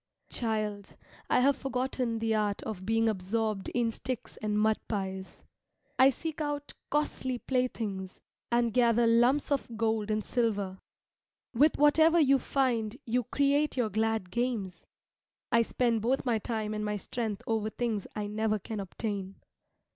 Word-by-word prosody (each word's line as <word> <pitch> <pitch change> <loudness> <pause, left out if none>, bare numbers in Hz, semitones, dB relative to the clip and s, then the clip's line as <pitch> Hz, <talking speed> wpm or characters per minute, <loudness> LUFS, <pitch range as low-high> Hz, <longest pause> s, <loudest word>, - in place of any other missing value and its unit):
Child, 215 -3 -2 0.3
I - - +4
have 280 +2 +4
forgotten 255 -3 -2
the 225 0 0
art 210 -2 0
of 195 -3 -6
being 225 0 +3
absorbed 215 0 -1
in 235 -2 0
sticks 255 +1 -5
and 210 -1 -1
mud 220 0 +3
pies. 190 -2 -4 0.6
I 260 +1 +8
seek 315 +4 -4
out 290 -1 -3 0.2
costly 270 -4 0
playthings, 225 -7 -2 0.3
and 235 -1 +2
gather 235 -1 +4
lumps 240 +6 +3
of 250 -5 -1
gold 220 -2 0
and 215 0 0
silver. 205 -6 -1 0.7
With 290 +6 +4
whatever 315 +3 +5
you 275 -3 +5
find 245 -6 0
you 245 0 0
create 285 +3 +1
your 230 -4 +1
glad 220 -4 0
games, 225 -5 -2 0.6
I 230 - +5
spend 230 -1 +1
both 255 +5 0
my 235 -3 +2
time 215 -1 -3
and 210 0 -3
my 210 0 -1
strength 215 0 -4
over 220 -1 0
things 220 -3 -2
I 210 - -2
never 215 +1 0
can 210 +2 -6
obtain. 195 0 -4
225 Hz, 145 wpm, -30 LUFS, 210-255 Hz, 0.7 s, I